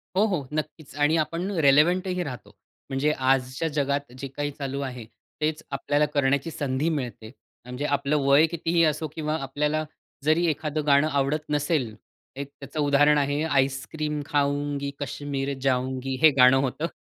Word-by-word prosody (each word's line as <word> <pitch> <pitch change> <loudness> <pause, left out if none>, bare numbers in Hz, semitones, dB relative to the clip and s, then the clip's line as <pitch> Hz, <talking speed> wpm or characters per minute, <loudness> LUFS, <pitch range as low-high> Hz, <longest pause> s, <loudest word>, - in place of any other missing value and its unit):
हो, 200 +3 +4
हो. 180 -10 -1
नक्कीच 155 -1 -5
आणि 150 +2 +2
आपण 165 +4 -1
रिलेव्हंटही 175 +6 +3
राहतो. 130 -6 -8 0.3
म्हणजे 135 +2 +1
आजच्या 130 +2 0
जगात 140 -2 -1
जे 135 - -5
काही 145 +2 -4
चालू 140 -1 -4
आहे, 125 -4 -5 0.4
तेच 155 0 -1
आपल्याला 145 +2 +1
करण्याची 140 +2 +1
संधी 140 +1 -1
मिळते. 125 -7 -4 0.3
म्हणजे 125 +3 -5
आपलं 145 +1 +1
वय 140 +3 +6
कितीही 165 +1 +1
असो, 155 0 0
किंवा 155 -1 -2
आपल्याला 150 +3 -1 0.4
जरी 155 +4 +3
एखादं 150 0 -2
गाणं 140 +1 +5
आवडत 145 +2 -1
नसेल, 145 -5 0 0.4
एक 140 +1 -6
त्याचं 140 +2 -7
उदाहरण 145 +1 +4
आहे 145 +1 0
आईसक्रीम 145 +1 -1
खाउंगी, 145 -1 -1
कश्मीर 140 0 -3
जाउंगी 130 0 -1
हे 160 - +9
गाणं 125 +1 +7
होतं. 140 +4 -2
145 Hz, 150 wpm, -25 LUFS, 135-155 Hz, 0.4 s, हे